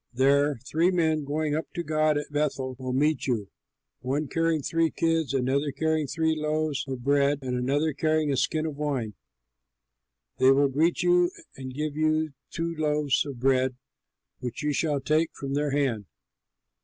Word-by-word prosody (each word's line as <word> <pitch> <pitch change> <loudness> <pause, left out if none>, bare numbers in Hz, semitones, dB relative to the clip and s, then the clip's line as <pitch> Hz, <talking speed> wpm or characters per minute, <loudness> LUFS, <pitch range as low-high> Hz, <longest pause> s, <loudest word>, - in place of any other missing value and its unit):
There 140 +3 +3
three 165 +6 +2
men 160 -4 +1
going 150 +1 -1
up 160 +2 -3
to 170 - -2
God 155 -1 +2
at 145 - -5
Bethel 135 -3 -1
will 130 -1 -4
meet 145 +2 +1
you, 110 -7 -1 0.5
one 140 +4 -2
carrying 165 0 0
three 165 +2 +1
kids, 165 -4 0
another 135 +2 0
carrying 160 0 0
three 160 +2 0
loaves 155 -1 -1
of 130 -2 -5
bread, 140 +1 +3
and 125 -1 -2
another 140 +5 0
carrying 155 0 +1
a - - +1
skin 155 +4 0
of 155 -3 -4
wine. 135 -8 -2 1.3
They 130 - +6
will 140 +1 +4
greet 160 +7 +1
you 175 0 +4 0.3
and 130 -1 -7
give 150 +2 -3
you 155 -1 +1 0.2
two 170 0 -3
loaves 150 -3 +1
of 135 -4 -7
bread 130 0 +2 0.6
which 125 +2 -5
you 150 0 +1
shall 145 -2 0
take 155 +3 +2
from 135 -1 -5
their 145 +1 0
hand. 135 -8 0
145 Hz, 165 wpm, -27 LUFS, 135-155 Hz, 1.3 s, They